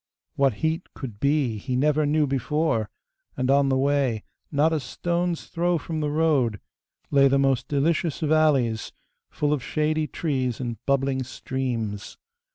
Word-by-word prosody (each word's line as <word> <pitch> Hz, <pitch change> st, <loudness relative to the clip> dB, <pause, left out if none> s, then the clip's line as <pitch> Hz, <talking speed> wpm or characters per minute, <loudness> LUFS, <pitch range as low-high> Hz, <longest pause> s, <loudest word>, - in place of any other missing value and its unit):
What 135 Hz, -5 st, +2 dB
heat 160 Hz, +3 st, -2 dB
could 115 Hz, -7 st, -7 dB
be 140 Hz, -6 st, +1 dB
he 130 Hz, +4 st, -3 dB
never 150 Hz, +3 st, +2 dB
knew 150 Hz, +1 st, +3 dB
before, 135 Hz, -4 st, 0 dB, 0.5 s
and 130 Hz, +1 st, +1 dB
on 140 Hz, 0 st, +4 dB
the 130 Hz, -, +2 dB
way, 135 Hz, -5 st, +1 dB, 0.3 s
not 155 Hz, +2 st, +3 dB
a 160 Hz, -, +1 dB
stone's 170 Hz, +4 st, -2 dB
throw 175 Hz, +1 st, 0 dB
from 160 Hz, 0 st, -4 dB
the 150 Hz, -1 st, -1 dB
road, 145 Hz, -9 st, +1 dB, 0.5 s
lay 140 Hz, -1 st, +6 dB
the 135 Hz, +1 st, +3 dB
most 135 Hz, -2 st, +1 dB
delicious 150 Hz, +2 st, 0 dB
valleys, 150 Hz, -8 st, +2 dB, 0.4 s
full 150 Hz, 0 st, 0 dB
of 145 Hz, -, -1 dB
shady 155 Hz, +2 st, 0 dB
trees 130 Hz, -8 st, -2 dB
and 120 Hz, -3 st, -5 dB
bubbling 135 Hz, -1 st, +1 dB
streams. 120 Hz, -5 st, -4 dB
140 Hz, 150 wpm, -25 LUFS, 130-155 Hz, 0.5 s, lay